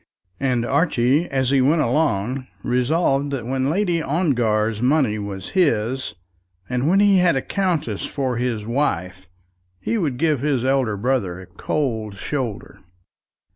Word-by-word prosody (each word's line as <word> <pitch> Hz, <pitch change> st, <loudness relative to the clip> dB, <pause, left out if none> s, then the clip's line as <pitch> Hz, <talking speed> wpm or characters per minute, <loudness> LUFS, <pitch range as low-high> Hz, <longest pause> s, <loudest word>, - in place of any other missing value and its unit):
And 125 Hz, -3 st, 0 dB
Archie, 140 Hz, +1 st, +2 dB
as 130 Hz, -1 st, 0 dB
he 135 Hz, -1 st, +4 dB
went 150 Hz, +4 st, +3 dB
along, 130 Hz, -2 st, 0 dB, 0.2 s
resolved 135 Hz, +3 st, +1 dB
that 125 Hz, -5 st, -3 dB
when 130 Hz, +2 st, -1 dB
Lady 175 Hz, -1 st, +1 dB
Ongar's 115 Hz, -, 0 dB
money 125 Hz, -5 st, +2 dB
was 100 Hz, -2 st, -6 dB
his, 130 Hz, -, 0 dB, 0.5 s
and 125 Hz, +3 st, -1 dB
when 195 Hz, +3 st, +4 dB
he 200 Hz, -2 st, +5 dB
had 180 Hz, -3 st, +3 dB
a 135 Hz, -, 0 dB
countess 170 Hz, -, -1 dB
for 130 Hz, -4 st, -2 dB
his 120 Hz, -4 st, -2 dB
wife, 95 Hz, -, -2 dB, 0.5 s
he 230 Hz, -, -1 dB
would 145 Hz, -9 st, -1 dB
give 150 Hz, -3 st, +1 dB
his 135 Hz, -4 st, 0 dB
elder 130 Hz, -6 st, +1 dB
brother 100 Hz, -6 st, -1 dB
a 95 Hz, -, -10 dB
cold 110 Hz, -5 st, -3 dB
shoulder. 120 Hz, 0 st, -4 dB
130 Hz, 140 wpm, -21 LUFS, 115-150 Hz, 0.5 s, he